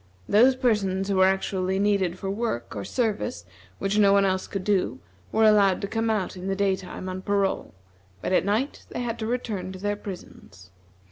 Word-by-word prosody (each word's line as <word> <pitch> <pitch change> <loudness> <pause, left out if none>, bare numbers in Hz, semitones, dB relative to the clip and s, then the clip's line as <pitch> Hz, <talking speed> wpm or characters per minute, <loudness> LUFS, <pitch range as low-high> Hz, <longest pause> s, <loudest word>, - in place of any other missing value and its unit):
Those 245 +6 +5
persons 205 -6 0
who 195 - +1
were 190 0 +6
actually 190 0 0
needed 195 -3 +1
for 195 - -5
work 195 - -3
or 100 - -4
service 200 - -2 0.3
which 200 +2 0
no 200 -1 +6
one 200 0 +5
else 190 -1 0
could 195 -2 -4
do 185 - 0 0.3
were 220 - +2
allowed 205 -3 +5
to 200 - -2
come 225 +2 -1
out 210 -5 -1
in 185 +1 -6
the 195 - 0
day 195 -1 +2
time 185 0 -8
on 185 0 -4
parole; 195 - -1 0.4
but 185 - -2
at - - +4
night 220 +9 -1
they - - -4
had 235 -1 -3
to 220 - -3
return 220 -6 -3
to - - -8
their 205 +2 -1
prisons. 100 - -11
195 Hz, 200 wpm, -25 LUFS, 185-210 Hz, 0.4 s, were